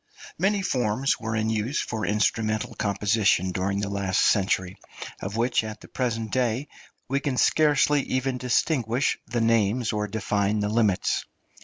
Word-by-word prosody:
Many 195 +2 +1
forms 125 - 0
were 110 -1 -3
in 110 0 0
use 110 +6 -1
for 110 -2 -3
instrumental 110 +1 0
composition 100 -2 +1
during 100 +2 -1
the 100 - -2
last 100 -2 -1
century, 95 -2 +1 0.4
of 100 +3 -4
which, 120 0 +1
at 110 -1 -7
the - - -12
present 115 -4 -2
day, 125 +2 0 0.4
we 135 +2 0
can 140 -2 -2
scarcely 150 -1 +3
even 130 -1 -2
distinguish 125 0 +1
the 120 0 -1
names 115 +1 +2
or 105 0 -1
define 105 -1 0
the 105 - 0
limits. 105 -4 +1
110 Hz, 150 wpm, -25 LUFS, 105-125 Hz, 0.4 s, scarcely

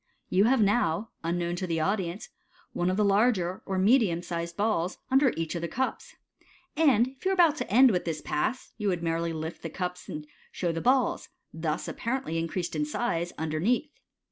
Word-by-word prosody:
You 195 +3 +4
now 215 -5 +2
have, 165 - -2
unknown 175 0 -1
to 185 - -3
the 165 -1 -1
audience, 190 +2 -2 0.4
one 175 +1 0
of 185 - 0
the 210 - +3
larger, 200 -3 +2
or 190 - -1
medium 190 -4 +3
sized 170 -1 -4
balls 200 -4 0
under 265 -1 +5
each 165 -1 -2
of 170 - -3
the 170 - -2
cups 260 +8 -3 0.6
j 320 - +1
and 240 0 +3
if 265 0 -20
you 380 - +2
were - - +2
about 340 -5 +5
to - - -4
end 255 +3 +7
with 180 -3 -1
this 160 -2 -2
Pass, 230 +12 -2
you 210 - -1
would 175 -3 0
merely 165 0 0
lift 160 +1 -5
the - - -5
cups 180 -1 -5
and 150 0 -6 0.3
show 175 -2 -1
the 165 0 -3
balls, 255 0 +2 0.2
thus 160 -1 -2
apparently 235 -9 -2
increased 170 +1 -3
in 150 - 0
size, 170 +1 -1
underneath. 175 - 0
180 Hz, 195 wpm, -28 LUFS, 165-235 Hz, 0.6 s, end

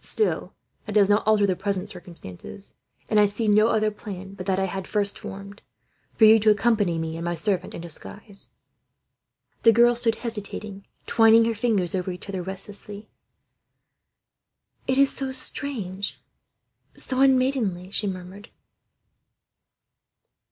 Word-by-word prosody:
"Still, 430 - -1 0.3
that 210 - -5
does 205 -1 +4
not 210 +1 +2
alter 215 -1 +4
the 190 -2 +1
present 200 +1 -3
circumstances; 175 - -8 0.3
and 215 - +3
I 205 - +6
see 210 +2 -2
no 210 +1 +5
other 215 -2 +2
plan 195 -2 -8
but 190 -1 -8
that 190 -1 +1
I 190 - +1
had 190 0 -5
first 205 -1 -1
formed, 200 +2 -9 0.5
for 220 - +6
you 220 +1 +8
to 215 +1 +4
accompany 210 -5 +2
me 160 0 -3
and 165 - -5
my 175 0 -1
servant, 185 +1 -1
in - - -6
disguise." 195 +5 -8 1.1
The 230 - +7
girl 240 +2 +5
stood 230 -1 +2
hesitating, 210 -3 -6 0.2
twining 225 0 +5
her 230 - +1
fingers 210 -6 0
over 185 -1 -2
each 180 +1 -7
other, 190 -2 -4
restlessly. 200 +3 -6 1.8
"It 260 - +1
is 275 0 +4
so 270 -1 -3
strange, 215 -8 -3 0.8
so 260 -1 -1
unmaidenly," 255 -9 +2
she 205 - +1
murmured. 190 +3 -7
205 Hz, 145 wpm, -25 LUFS, 190-225 Hz, 1.8 s, you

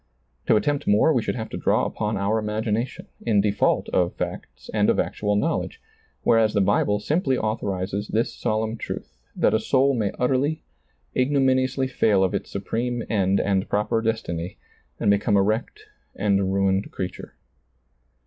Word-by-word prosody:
To - - +5
attempt 145 +6 0
more 105 +10 +4
we 125 - +2
should 110 - -2
have 110 -2 -5
to - - -5
draw - - +2
upon 105 +1 -2
our 100 +3 +1
imagination, 110 +2 -2 0.2
in 110 -4 +2
default 100 0 +1
of 90 -1 +1
facts - - -6
and - - +2
of - - +2
actual 105 -1 0
knowledge, 165 - -1 0.4
whereas 110 -2 +3
the - - +4
Bible 105 +1 +2
simply 140 - 0
authorizes 100 -2 -2
this 115 +2 0
solemn 110 +1 -1
truth, - - -7 0.2
that - - +2
a 110 - +3
soul 135 +4 +2
may 110 -5 0
utterly, 135 +5 0 0.5
igno 135 +2 +2
miniously 130 0 +2
fail 105 -6 +2
of 95 - 0
its - - -3
supreme 115 +5 -2
end 100 -2 +2
and 95 -1 0
proper 105 +2 +1
des 115 0 +1
tiny, 85 +1 -5 0.4
and 100 - +3
become 100 +1 +2
a 100 - +4
wrecked 110 - -2 0.3
and 100 -2 +1
ruined 95 0 +1
creature. 90 -1 -6
110 Hz, 165 wpm, -24 LUFS, 100-125 Hz, 0.5 s, To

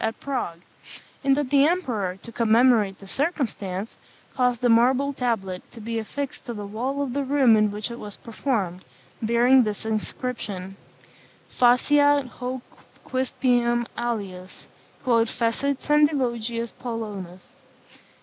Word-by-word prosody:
at 225 0 -2
Prague; 245 -12 -3 0.6
and 275 0 +3
that 285 -3 -1
the 280 -1 +6
emperor, 245 - 0
to 230 - -9
commemorate 230 -3 +3
the 195 - -13
circumstance, 220 - -2 0.4
caused 250 -2 +1
a - - +5
marble 255 +5 +4
tablet 205 -8 -2
to 235 - -12
be 225 +1 -3
affixed 275 +5 -5
to 245 - -6
the 205 -1 -5
wall 255 +7 -2
of 260 -3 -4
the 280 +1 0
room 265 -4 +4
in 215 -1 +3
which 210 +3 -5
it 235 - -7
was 205 -1 -8
performed, 215 -7 -2 0.4
bearing 240 +3 +5
this 210 -1 -4
inscription, 215 -3 -4 0.8
"Faciat 285 +3 +4
hoc 250 +1 -5 0.4
quispiam 245 -2 +1
alius, 195 -6 -4 0.4
quod 235 -3 +3
fecit 250 +4 0
Sendivogius 240 -6 +1
Polonus." 205 -7 -6
235 Hz, 130 wpm, -25 LUFS, 215-265 Hz, 0.8 s, the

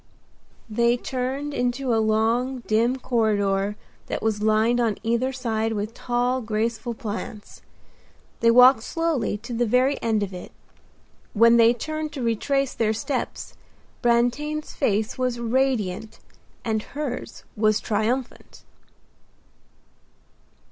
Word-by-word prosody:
They 235 +2 +2
turned 265 +4 -3
into 250 0 0
a 225 - +3
long, 230 +4 +1
dim 230 +4 +2
corridor 205 -5 0 0.3
that - - -4
was 215 -2 0
lined 220 +3 +3
on 225 -4 +1
either 235 +3 0
side 225 -4 -2
with 210 +1 -3
tall, 245 +2 -1
graceful 225 +1 -2
plants. 215 -2 -7 0.8
They 230 - +4
walked 250 +1 +7
slowly 315 -7 -1
to 235 +4 -8
the 240 0 0
very 255 +5 +2
end 220 -2 +1
of 195 -1 -5
it. 180 - -8 0.8
When 230 +2 +6
they 230 0 +6
turned 310 +4 -4
to 270 -4 -4
retrace 270 +4 0
their 220 -1 +1
steps 255 +4 -4 0.5
Brantain's 245 +6 0
face 220 -2 0
was 250 -1 0
radiant 230 -4 -1 0.5
and 220 -2 0
hers 280 0 -6
was 215 -1 +2
triumphant. 230 +4 -3
235 Hz, 120 wpm, -24 LUFS, 220-255 Hz, 0.8 s, walked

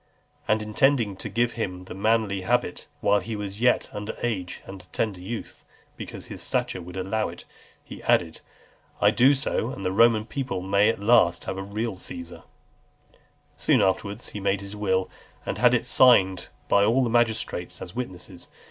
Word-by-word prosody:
And 110 0 +2
intending 115 -1 +2
to - - -6
give 120 +1 +1
him 90 -5 -4
the - - -8
manly 105 -1 +1
habit, 120 -2 -1
while 105 0 +4
he 115 +1 -5
was 105 0 -6
yet 125 0 +3
under 105 0 -5
age 95 -7 -3
and 95 -1 -9
a - - -20
tender 105 -5 -2
youth, 105 +5 -7 0.3
because - - -8
his - - -8
stature 90 - -2
would 90 +2 -9
allow 95 +4 -1
of 85 - -7
it, - - -13 0.4
he - - -10
added, 80 -2 +1 0.6
"I - - +5
do 130 +6 +5
so, 130 -3 -1
that 115 -7 -6
the 95 - 0
Roman 110 +1 +4
people 130 -6 -3
may 100 +2 +3
at 115 - -1
last 105 -4 +4
have 95 - -4
a - - -3
real 105 +1 -3
Caesar." 85 -1 -8
XLIV. - - -29 0.4
Soon - - +3
afterwards 100 +2 -1
he 105 - -6
made 100 0 0
his 100 +1 -7
will, 95 -3 0 0.4
and - - -3
had - - +5
it - - 0
signed 95 -8 +4 0.2
by 100 - +4
all 120 +6 +3
the 120 - 0
magistrates 115 -6 0
as 90 - -9
witnesses. 90 -7 -6
105 Hz, 185 wpm, -25 LUFS, 95-115 Hz, 0.6 s, I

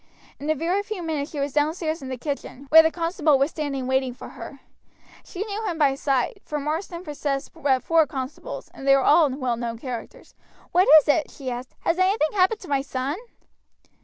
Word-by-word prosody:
In 290 - -5
a 310 - +3
very 345 +7 0
few 410 -3 -6
minutes 305 -3 -2
she 300 - -6
was 280 -1 -2
downstairs 315 +2 0
in 265 - -7
the 260 - -4
kitchen, 280 0 -5
where 320 +1 +10
the 320 - +2
constable 330 -3 +1
was 275 +4 +1
standing 280 -4 -3
waiting 260 -1 0
for - - -10
her. - - -10 0.6
She 390 +2 -5
knew 425 +1 -4
him 340 - -2
by 285 -3 +3
sight, 275 - -1
for 300 - -4
Marsden 330 +4 -3
possessed 285 -3 -3
but 275 -6 +1
four 325 -2 +3
constables, 265 +1 -6
and 270 - -8
they 275 - +7
were 270 - +2
all 305 +1 +5
well 255 -3 -2
known 230 -1 -4
characters. 245 -1 -8 0.4
"What 365 +2 +4
is - - -22
it?" 300 +1 +2
she 265 -3 -6
asked; 245 +1 -7
"has 340 - 0
anything 370 -4 +2
happened 400 +2 +2
to 370 - -10
my 275 -2 +1
son?" 270 +1 -3
295 Hz, 205 wpm, -24 LUFS, 270-330 Hz, 0.6 s, where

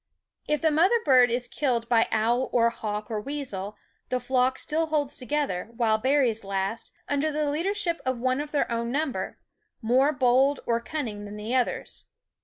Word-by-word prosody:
If 300 -1 0
the 320 - +3
mother 360 +10 +4
bird 255 -3 +6
is 245 +1 0
killed 240 -5 -1
by 230 -1 +3
owl 235 +4 +1
or 235 -1 +3
hawk 215 -1 -5
or 215 -1 -2
weasel, 210 -7 -5 0.3
the 255 - 0
flock 260 0 +1
still 320 +1 -1
holds 295 -2 0
together, 275 -9 -2
while 220 -3 +2
berries 255 -3 +2
last, 195 +2 -3 0.2
under 285 +2 0
the 300 -1 0
leadership 345 +1 -1
of 260 -1 -1
one 255 +3 0
of 295 0 -7
their 285 -4 0
own 235 0 -1
number, 290 0 -2 0.4
more 255 +5 +3
bold 265 0 +3
or 230 0 +1
cunning 235 -8 -5
than 205 0 -8
the 215 +3 -4
others. 255 -2 -1
255 Hz, 175 wpm, -26 LUFS, 230-290 Hz, 0.4 s, bird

